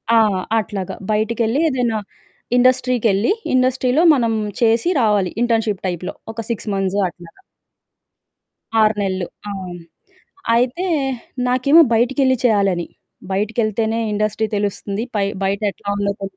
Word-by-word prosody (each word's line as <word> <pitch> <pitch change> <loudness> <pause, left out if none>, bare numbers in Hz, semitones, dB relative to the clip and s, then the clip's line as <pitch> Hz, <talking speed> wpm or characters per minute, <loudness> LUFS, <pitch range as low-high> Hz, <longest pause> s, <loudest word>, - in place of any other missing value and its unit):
ఆ! - - +6 0.4
అట్లాగ. 200 -3 -4 0.2
బయటికెళ్ళి 225 +4 0
ఏదైనా 245 -5 0 0.6
ఇండస్ట్రీకెళ్లి, 245 -4 +2 0.2
ఇండస్ట్రీలో 255 +3 +2
మనం 230 -4 +1 0.3
చేసి 230 +7 +3
రావాలి. 205 -5 +2
ఇంటర్న్‌షిప్ 225 -4 0
టైప్‌లో 180 0 -4 0.2
ఒక 230 - -4
6 225 -1 -4
మంత్స్ 195 0 -1
అట్లాగ. 175 -1 -16 1.4
6 215 0 +3
నెలలు, 185 -3 -2 0.2
అవును. 180 -3 -7 0.7
అయితే 250 +9 0 0.6
నాకేమో 255 +6 +5
బయటికెళ్ళి 260 +3 +2
చేయాలని, 195 -7 +2 0.4
బయటికెళ్తేనే 220 +2 0
ఇండస్ట్రీ 215 +1 0
తెలుస్తుంది. 205 +1 -2
పై 200 -1 +2 0.2
బయటెట్లా 200 +1 -2
ఉందో 200 0 0
తెల్ 195 -1 -6
220 Hz, 105 wpm, -19 LUFS, 195-245 Hz, 1.4 s, ఆ